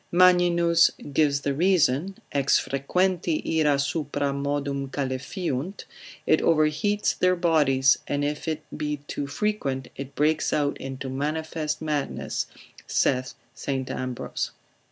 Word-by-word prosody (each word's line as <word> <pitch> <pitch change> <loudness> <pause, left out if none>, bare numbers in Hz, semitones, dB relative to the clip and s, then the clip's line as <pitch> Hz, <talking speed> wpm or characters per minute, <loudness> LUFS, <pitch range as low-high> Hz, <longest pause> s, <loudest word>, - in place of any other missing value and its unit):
Magninus 175 -2 +5 0.2
gives 140 -1 +2
the 140 - -1
reason, 175 +1 +2
Ex 140 -1 +3
frequenti 165 +3 0
ira 150 -2 +3
supra 140 0 -1
modum 140 -1 -2
calefiunt; 140 +5 -3 0.4
it - - +3
overheats 165 +7 +2
their 185 0 +4
bodies, 145 -6 +3
and 145 0 0
if 150 +2 -3
it 155 -1 -2
be 150 0 -2
too 140 - -3
frequent, 140 -7 -2
it 140 0 -8
breaks 155 +2 +2
out 145 -1 +1
into 135 0 -6
manifest 155 +3 -2
madness, 150 -2 -2 0.4
saith 130 0 +1 0.2
St. 135 -2 -3
Ambrose. 130 -1 -3
150 Hz, 115 wpm, -25 LUFS, 140-170 Hz, 0.4 s, Magninus